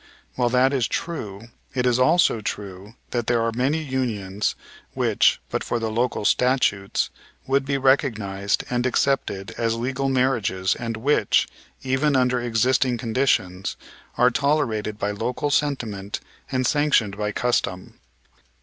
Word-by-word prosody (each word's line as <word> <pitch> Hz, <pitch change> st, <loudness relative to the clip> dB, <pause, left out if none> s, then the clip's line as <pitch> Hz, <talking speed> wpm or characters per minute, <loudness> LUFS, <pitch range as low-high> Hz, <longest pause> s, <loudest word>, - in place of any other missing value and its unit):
While 120 Hz, -1 st, +1 dB
that 130 Hz, +3 st, +3 dB
is 130 Hz, -4 st, +1 dB
true 115 Hz, -, -5 dB, 0.3 s
it 125 Hz, -1 st, +1 dB
is 125 Hz, 0 st, +2 dB
also 155 Hz, -4 st, +4 dB
true 100 Hz, +1 st, -6 dB, 0.2 s
that 120 Hz, -2 st, -2 dB
there 120 Hz, -1 st, +2 dB
are 115 Hz, -, 0 dB
many 135 Hz, +7 st, 0 dB
unions, 110 Hz, -8 st, -2 dB, 0.4 s
which, -, -, +3 dB
but -, -, -1 dB
for -, -, -1 dB
the 115 Hz, -1 st, -2 dB
local 120 Hz, -1 st, -1 dB
statutes, 125 Hz, -7 st, +1 dB, 0.3 s
would 135 Hz, +1 st, +1 dB
be 140 Hz, 0 st, 0 dB
recognized 110 Hz, -8 st, +1 dB
and 125 Hz, 0 st, 0 dB
accepted 125 Hz, -7 st, 0 dB
as 115 Hz, -1 st, +1 dB
legal 130 Hz, +3 st, -1 dB
marriages 115 Hz, -8 st, +1 dB
and 115 Hz, -2 st, -4 dB
which, 115 Hz, -3 st, +2 dB, 0.4 s
even 135 Hz, +3 st, +1 dB
under 125 Hz, -1 st, +2 dB
existing 120 Hz, +2 st, +1 dB
conditions, 115 Hz, -6 st, 0 dB, 0.4 s
are 125 Hz, +1 st, +5 dB
tolerated 115 Hz, -7 st, 0 dB
by 105 Hz, -1 st, -1 dB
local 125 Hz, +7 st, -2 dB
sentiment 115 Hz, -10 st, -1 dB, 0.3 s
and 130 Hz, -1 st, 0 dB
sanctioned 140 Hz, -8 st, +2 dB
by 105 Hz, 0 st, -2 dB
custom. 100 Hz, -5 st, -2 dB
120 Hz, 135 wpm, -23 LUFS, 105-130 Hz, 0.4 s, are